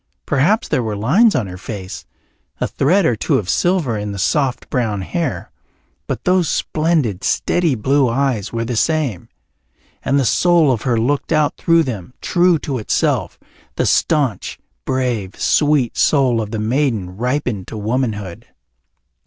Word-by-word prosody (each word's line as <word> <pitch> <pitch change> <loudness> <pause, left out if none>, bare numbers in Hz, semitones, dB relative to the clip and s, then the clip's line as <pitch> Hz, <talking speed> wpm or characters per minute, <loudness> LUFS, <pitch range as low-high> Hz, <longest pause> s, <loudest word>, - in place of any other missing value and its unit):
Perhaps 160 - +1
there - - +1
were 110 -3 -3
lines 175 - +3
on 125 - 0
her 90 -1 -8
face, 95 -2 -7 0.5
a - - 0
thread 180 +7 +2
or 120 - +2
two - - 0
of 100 - -3
silver 175 - +1
in 105 0 -4
the - - -6
soft 130 +6 0
brown 110 -6 -1
hair, 135 - -3 0.6
but - - -4
those 180 -3 +2
splendid 155 - 0
steady 170 -6 +1
blue 135 +3 +2
eyes 120 -4 -1
were 115 0 -2
the 120 +1 -3
same, 145 - -1 0.7
and 140 +1 +2
the 135 - +1
soul 170 +2 +3
of 115 -4 -1
her 120 -4 0
looked 140 +8 -1
out 155 -2 +2
through 165 -1 +3
them, 120 - -6
true 175 -1 +2
to 135 -3 -4
itself, 105 - -1 0.4
the - - 0
staunch, 145 -9 0 0.3
brave, 125 -7 -2
sweet 145 -6 +2
soul 130 -6 +2
of 105 - -5
the 110 - -4
maiden 110 -5 -1
ripened 125 -3 -2
to 110 - -7
womanhood. 105 -4 -3
125 Hz, 155 wpm, -18 LUFS, 110-150 Hz, 0.7 s, lines